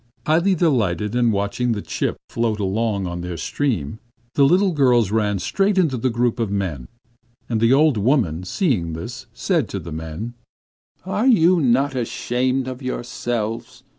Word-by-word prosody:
Highly 170 Hz, +5 st, +3 dB
delighted, 105 Hz, -, +1 dB
and 120 Hz, -2 st, +3 dB
watching 105 Hz, +4 st, 0 dB
the 105 Hz, -, -3 dB
chip -, -, -2 dB
float 115 Hz, -2 st, -1 dB
along 100 Hz, 0 st, -1 dB
on 85 Hz, 0 st, -4 dB
their 90 Hz, -1 st, -5 dB
stream, 110 Hz, -, -2 dB, 0.3 s
the 140 Hz, -, +3 dB
little 185 Hz, +6 st, +4 dB
girls 125 Hz, -, +3 dB
ran 105 Hz, -2 st, +1 dB
straight 195 Hz, -, 0 dB
into 160 Hz, -8 st, +2 dB
the 125 Hz, +2 st, 0 dB
group 120 Hz, 0 st, 0 dB
of 115 Hz, -3 st, 0 dB
men; 90 Hz, -11 st, -3 dB, 0.6 s
and 110 Hz, -2 st, -1 dB
the 115 Hz, +1 st, +4 dB
old 145 Hz, -2 st, +4 dB
woman, 105 Hz, -, +1 dB
seeing 90 Hz, -, 0 dB
them, 80 Hz, +8 st, -5 dB, 0.2 s
said -, -, 0 dB
to -, -, -4 dB
the 85 Hz, -, -9 dB
men: 80 Hz, +9 st, -6 dB, 0.7 s
'Are 210 Hz, +6 st, 0 dB
you 185 Hz, -7 st, +5 dB
not 135 Hz, +2 st, +2 dB
ashamed 125 Hz, +1 st, -1 dB
of 130 Hz, 0 st, -6 dB
yourselves? 120 Hz, -2 st, -4 dB
120 Hz, 160 wpm, -21 LUFS, 100-135 Hz, 0.7 s, you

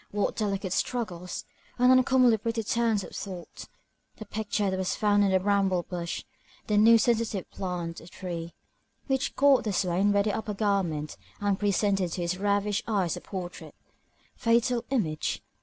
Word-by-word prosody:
What 205 Hz, 0 st, -1 dB
delicate 195 Hz, -3 st, -2 dB
struggles! 180 Hz, -9 st, -3 dB, 0.3 s
and 250 Hz, +1 st, +5 dB
uncommonly 255 Hz, -2 st, +5 dB
pretty 230 Hz, +1 st, -2 dB
turns 225 Hz, -2 st, +1 dB
of -, -, -10 dB
thought! 185 Hz, -4 st, -7 dB, 0.5 s
The 215 Hz, -, -8 dB
picture 210 Hz, -1 st, -1 dB
that 190 Hz, -, -1 dB
was 185 Hz, -, -1 dB
found 205 Hz, -1 st, +3 dB
on 195 Hz, -, +2 dB
a 190 Hz, -, +4 dB
bramble 195 Hz, -2 st, +1 dB
bush, 170 Hz, -2 st, -5 dB, 0.4 s
the 210 Hz, -, 0 dB
new 225 Hz, +2 st, +7 dB
sensitive 225 Hz, -4 st, 0 dB
plant, 175 Hz, -3 st, -4 dB
or 165 Hz, -, -13 dB
tree, 175 Hz, -2 st, -6 dB, 0.5 s
which 270 Hz, -1 st, -1 dB
caught 275 Hz, -1 st, +5 dB
the 215 Hz, -, -1 dB
swain 190 Hz, +1 st, +1 dB
by 200 Hz, 0 st, +3 dB
the 210 Hz, -1 st, 0 dB
upper 215 Hz, -2 st, -4 dB
garment, 190 Hz, -8 st, -1 dB, 0.2 s
and 200 Hz, -1 st, 0 dB
presented 200 Hz, -3 st, +1 dB
to 180 Hz, -, -3 dB
his 175 Hz, +2 st, -2 dB
ravished 205 Hz, +1 st, 0 dB
eyes 195 Hz, -7 st, 0 dB
a -, -, -8 dB
portrait. 180 Hz, -3 st, -7 dB, 0.6 s
Fatal 235 Hz, +1 st, +1 dB
image! 175 Hz, -, -1 dB
200 Hz, 160 wpm, -28 LUFS, 180-220 Hz, 0.6 s, new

